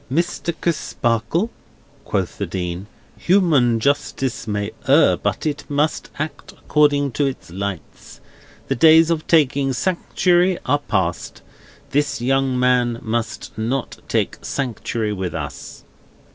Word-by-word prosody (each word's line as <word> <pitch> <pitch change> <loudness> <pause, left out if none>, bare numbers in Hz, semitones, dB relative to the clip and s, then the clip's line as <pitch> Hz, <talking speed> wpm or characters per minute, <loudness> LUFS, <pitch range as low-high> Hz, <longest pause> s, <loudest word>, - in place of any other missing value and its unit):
"Mr. 170 +2 0
Crisparkle," 150 - 0 0.5
quoth - - -2
the - - -2
Dean, 90 +1 -4 0.3
"human 150 - +3
justice 135 -2 -1
may 105 0 -2 0.2
err, 140 +4 +5
but - - -2
it 150 -1 -2
must 145 +2 0
act 155 +1 -5
according 145 -2 +2
to 140 +5 +1
its 130 -10 -6
lights. 95 -1 -6 0.5
The - - +1
days 160 +4 +6
of 160 -2 -1
taking 140 -4 +3
sanctuary 180 +2 +1
are 145 +3 +2
past. 95 - -2 0.5
This 145 +1 0
young 130 +1 +1
man 125 -2 +2
must 115 +1 -3
not 120 +4 -2
take - - -1
sanctuary 115 -4 -2
with 95 -4 -4
us." - - -7
135 Hz, 120 wpm, -21 LUFS, 115-155 Hz, 0.5 s, days